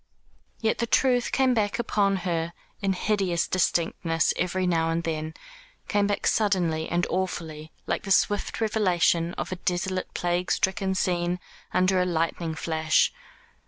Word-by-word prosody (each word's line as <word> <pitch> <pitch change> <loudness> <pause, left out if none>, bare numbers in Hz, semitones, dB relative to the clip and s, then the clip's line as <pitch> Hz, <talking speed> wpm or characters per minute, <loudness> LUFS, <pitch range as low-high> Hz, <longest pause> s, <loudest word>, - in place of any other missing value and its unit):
Yet 220 -1 +1
the 235 - 0
truth 250 0 +2
came 260 -1 +3
back 210 -3 0
upon 205 -4 +1
her 170 -1 -1 0.3
in 195 -1 +1
hideous 190 -3 0
distinctness 165 -2 +1
every 185 +1 -1
now 165 -2 +1
and 165 +1 -1
then 160 -1 -3 0.5
came 205 -1 +2
back 205 - -2
suddenly 175 -7 +1
and 175 0 +1
awfully, 160 -4 -3
like - - -1
the 205 - -8
swift 205 +1 +2
revelation 180 -6 +2
of - - -4
a 185 - -3
desolate 185 +1 -2
plague 175 +1 -1
stricken 190 0 0
scene 175 -1 0 0.3
under 185 0 +3
a - - +2
lightning 165 -1 -1
flash. 160 0 +1
180 Hz, 145 wpm, -26 LUFS, 165-200 Hz, 0.5 s, came